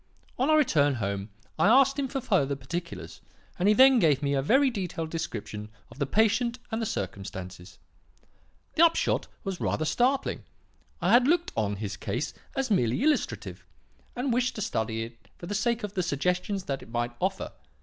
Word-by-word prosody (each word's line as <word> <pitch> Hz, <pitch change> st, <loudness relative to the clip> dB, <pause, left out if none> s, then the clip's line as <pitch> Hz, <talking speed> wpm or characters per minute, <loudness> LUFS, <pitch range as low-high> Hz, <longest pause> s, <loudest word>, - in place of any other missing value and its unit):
On 265 Hz, +4 st, +2 dB
our 310 Hz, -, +6 dB
return 145 Hz, -, +3 dB
home 100 Hz, -2 st, -3 dB, 0.3 s
I -, -, +5 dB
asked 275 Hz, +4 st, +5 dB
him 275 Hz, -, 0 dB
for 270 Hz, -, -3 dB
further 145 Hz, -, +1 dB
particulars, 170 Hz, +6 st, -6 dB, 0.4 s
and 180 Hz, -, +2 dB
he 210 Hz, -, +5 dB
then 265 Hz, +1 st, +7 dB
gave 150 Hz, -6 st, +3 dB
me 140 Hz, 0 st, +1 dB
a 135 Hz, -, +2 dB
very 265 Hz, -, +4 dB
detailed 175 Hz, -6 st, -4 dB
description 105 Hz, -9 st, -5 dB, 0.2 s
of -, -, -14 dB
the 140 Hz, -, 0 dB
patient 225 Hz, -, +2 dB
and 225 Hz, +1 st, -1 dB
the 225 Hz, -, -1 dB
circumstances. 95 Hz, -, -6 dB, 1.0 s
The 325 Hz, -, +4 dB
upshot 335 Hz, 0 st, +2 dB, 0.2 s
was 195 Hz, -3 st, -4 dB
rather 155 Hz, -, 0 dB
startling. 250 Hz, -, +1 dB, 0.6 s
I -, -, +3 dB
had 245 Hz, +1 st, +6 dB
looked 345 Hz, +2 st, +2 dB
on 105 Hz, -2 st, 0 dB
his 105 Hz, 0 st, -5 dB
case -, -, -3 dB, 0.2 s
as 270 Hz, -3 st, -1 dB
merely 125 Hz, -, +2 dB
illustrative, 305 Hz, 0 st, -1 dB, 0.5 s
and 250 Hz, 0 st, -1 dB
wished 250 Hz, +1 st, +1 dB
to 215 Hz, -, -4 dB
study 110 Hz, -, -2 dB
it 115 Hz, -2 st, -12 dB
for -, -, -9 dB
the 200 Hz, -, -4 dB
sake 235 Hz, +2 st, 0 dB
of 205 Hz, -1 st, -4 dB
the 185 Hz, -, 0 dB
suggestions 180 Hz, +5 st, -1 dB
that 135 Hz, -5 st, -3 dB
it -, -, -13 dB
might 120 Hz, +1 st, -1 dB
offer. -, -, -1 dB
180 Hz, 180 wpm, -28 LUFS, -, 1.0 s, then